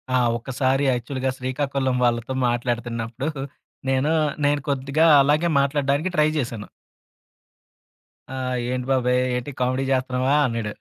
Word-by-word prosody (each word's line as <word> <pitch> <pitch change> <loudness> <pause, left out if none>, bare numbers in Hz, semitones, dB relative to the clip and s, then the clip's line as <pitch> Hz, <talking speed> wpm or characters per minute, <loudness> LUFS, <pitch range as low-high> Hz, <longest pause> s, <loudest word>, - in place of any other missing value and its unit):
ఆ! - - +5 0.2
ఒక్కసారి 130 +3 0
యాక్చువల్‌గా 130 +2 -2
శ్రీకాకుళం 130 0 -1
వాళ్ళతో 120 +2 0
మాట్లాడుతున్నప్పుడు, 120 +1 -2 0.6
నేను 135 +4 +1 0.3
నేను 145 0 +2
కొద్దిగా 140 +4 +1 0.2
అలాగే 150 +5 +2
మాట్లాడడానికి 140 +4 +1
ట్రై 155 -1 +4
చేశాను. 120 -6 -3 1.6
ఆ! - - -7 0.4
"ఏంటి 125 -1 -2
బాబాయ్ 125 -1 +2 0.2
ఏంటి 125 +3 -4
కామెడీ 130 +2 0
జేస్తన్నావా" 130 +1 +1
అన్నాడు. 115 -3 -3
130 Hz, 110 wpm, -23 LUFS, 125-140 Hz, 1.6 s, ఆ